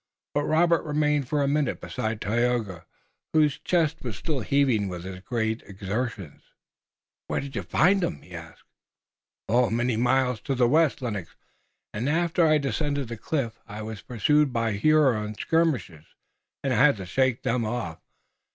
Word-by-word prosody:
But 145 0 0
Robert 170 +1 +3
remained 150 -2 0
for 145 -2 +1
a - - +1
minute 145 -1 0
beside 110 -4 -3
Tayoga, 110 -6 -1 0.5
whose 150 -3 +3
chest 165 -3 +1
was 115 -6 -5
still 145 +6 -2
heaving 125 -4 +2
with 90 -2 -6
his 95 0 -7
great 110 +2 -2
exertions. 100 - -4 0.9
"Where - - -1
did 140 0 -7
you - - -1
find 195 +4 +3
them?" 175 -1 -3
he 90 - -15
asked. 80 -1 -10 0.8
"Many 120 +1 +2
miles 125 -1 +1
to 135 - -2
the 125 -1 +3
west, 150 0 +2
Lennox. 100 -8 -4 0.6
After 160 +9 +1
I 155 0 +5
descended 140 -2 -2
the 115 - -4
cliff 115 -2 -3
I 110 0 -7
was 110 -1 -7
pursued 140 +5 +2
by 115 -2 0
Huron 110 -3 +2
skirmishers, 135 - 0 0.6
and 135 -2 +1
I 125 - +4
had 145 -6 +5
to 95 - -6
shake 130 +4 0
them 120 0 0
off. 110 -8 -3
125 Hz, 155 wpm, -26 LUFS, 110-150 Hz, 0.9 s, I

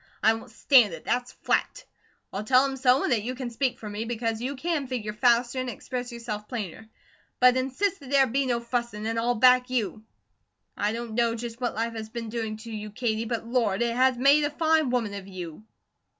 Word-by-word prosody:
I 220 - +6
won't 225 - -8
stand 225 -4 +4
it, 160 - -13
that's 245 0 -1
flat! - - -1 0.5
I'll 195 +2 -3
tell 255 +4 +5
'em 270 -1 -2
so, 255 +1 +3
and - - 0
that 230 -4 +3
you 250 +4 -4 0.2
speak 250 +2 -1
for 215 - -8
me, 210 +1 -4
because 230 -1 -2
you 265 +3 -3
can 300 0 -2
figure 225 -5 -3
faster 240 +3 +2
and 255 -1 -2
express 245 +2 -5
yourself 225 -3 -6
plainer; 220 -2 -6 0.5
but 250 0 +6
insist 270 +10 0
that 275 -3 -12
there 275 -1 +5
be 265 +2 0
no 240 -2 0
fussing, 235 -3 -3
an' 225 +1 -1
I'll 240 +1 +1
back 250 +2 +5
you. 220 -3 -2 0.7
I 205 +1 0
don't 230 0 -5
know 230 0 +1
just 235 +1 -7
what 245 - -1
life 230 +1 -1
has 220 -1 -6
been 230 0 -6
doing 220 -1 -3
to 225 +1 -10
you, 215 -1 -5
Katie, 220 0 -2
but 230 0 -3
Lord! 230 -4 +1
it 235 0 -1
has 255 0 +3
made 280 +4 +5
a 290 - +1
fine 315 -1 +2
woman 235 -5 0
of 200 -1 -7
you." 180 0 -8
235 Hz, 215 wpm, -26 LUFS, 220-255 Hz, 0.7 s, I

